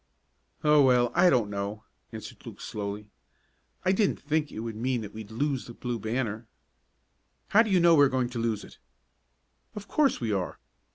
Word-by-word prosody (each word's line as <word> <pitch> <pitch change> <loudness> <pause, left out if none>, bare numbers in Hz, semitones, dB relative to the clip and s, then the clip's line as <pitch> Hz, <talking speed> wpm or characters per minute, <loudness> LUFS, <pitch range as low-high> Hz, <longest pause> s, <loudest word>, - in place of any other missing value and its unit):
"Oh, 150 -1 +6
well, 125 -3 +4
I 180 +1 +5
don't 115 -8 +2
know," 100 +2 -4 0.3
answered - - -9
Luke - - -10
slowly. 105 0 -5 0.8
"I 185 - +4
didn't 195 +1 +1
think 155 0 -1
it 110 - -6
would 115 -1 -5
mean 125 +2 -1
that 105 -1 -8
we'd 110 -1 -8
lose 135 +3 -2
the 120 - -10
Blue 120 -2 -4
Banner." 110 0 -3 1.0
"How 215 - +6
do 225 - 0
you 190 -2 +4
know 170 -1 +6
we 145 -3 +7
are - - +2
going 130 -2 0
to 120 - -4
lose 115 -2 -1
it?" - - -14 1.0
"Of 205 -1 -8
course 295 -3 +2
we 115 -3 -2
are. 95 -3 -2
120 Hz, 185 wpm, -28 LUFS, 110-150 Hz, 1.0 s, we